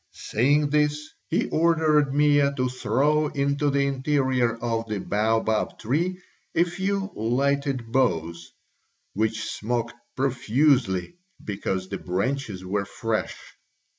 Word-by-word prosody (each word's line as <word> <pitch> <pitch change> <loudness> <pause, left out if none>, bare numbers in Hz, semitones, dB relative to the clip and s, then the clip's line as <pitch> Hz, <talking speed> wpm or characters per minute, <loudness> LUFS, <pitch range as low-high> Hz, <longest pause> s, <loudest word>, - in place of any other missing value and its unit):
Saying 145 +5 +3
this, 150 0 +1 0.2
he - - +1
ordered 155 -3 +3
Mea 145 0 +4
to 130 0 +1
throw 135 +6 +1
into 140 +1 0
the 140 0 +2
interior 130 -3 +1
of 115 -1 -2
the 105 - -1
baobab 110 +2 0
tree 170 +11 -1 0.4
a 170 - +5
few 195 +3 -2
lighted 130 +1 0
boughs, 85 -10 0 0.6
which 110 +1 -1
smoked 120 +1 -2 0.2
profusely 130 - +1 0.3
because 95 -2 -3
the 100 0 -5
branches 100 +1 -2
were 100 +2 -1
fresh. 115 +1 -3
130 Hz, 110 wpm, -25 LUFS, 110-150 Hz, 0.6 s, a